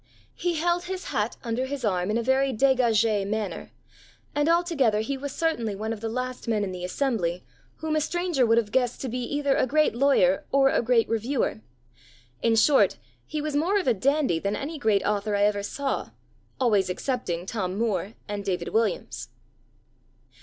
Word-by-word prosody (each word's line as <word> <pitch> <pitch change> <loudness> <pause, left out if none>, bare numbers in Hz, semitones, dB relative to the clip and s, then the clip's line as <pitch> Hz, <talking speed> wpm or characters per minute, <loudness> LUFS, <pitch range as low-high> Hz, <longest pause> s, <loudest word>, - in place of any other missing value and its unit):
He 350 -1 -1
held 345 +2 0
his 370 0 -5
hat 210 +2 -1
under 240 +3 -2
his 275 -3 -4
arm 185 -2 0
in 215 - +1
a 235 - -1
very 265 +2 +2
dégagée 230 -5 +3
manner 215 -2 -3 0.6
and 295 +2 +1
altogether 325 -11 +2
he 275 +6 -2
was 280 +1 -5
certainly 260 -10 -1
one 220 +3 -3
of 215 - -8
the 225 - -2
last 255 +2 -4
men 215 -3 +1
in 195 - -3
the 180 -1 -6
assembly, 180 -4 -1 0.4
whom 315 -1 -1
a 310 - +2
stranger 345 -3 0
would 230 -1 +4
have 215 -3 +1
guessed 245 -1 +1
to 265 - -3
be 250 +2 -3
either 285 +3 0
a - - +2
great 305 +4 +3
lawyer 275 +2 +3
or 270 0 +5
a - - +2
great 235 -1 +3
reviewer. 230 0 -1 0.8
In 230 -1 +3
short, 270 +6 +4 0.3
he 305 -1 -3
was 305 -1 -2
more 345 +8 +2
of 370 - -4
a 250 - +5
dandy 265 - +1
than 200 +4 -1
any 300 +2 -5
great 215 -6 +2
author 205 0 0
I 200 - +2
ever 205 0 +2
saw 275 +6 -3 0.5
always 210 -7 +2
excepting 180 -5 -2
Tom 190 -2 -3
Moore 210 -2 -1
and 205 -1 -4
David 180 -3 -2
Williams." 225 -1 -1
235 Hz, 185 wpm, -26 LUFS, 210-280 Hz, 0.8 s, or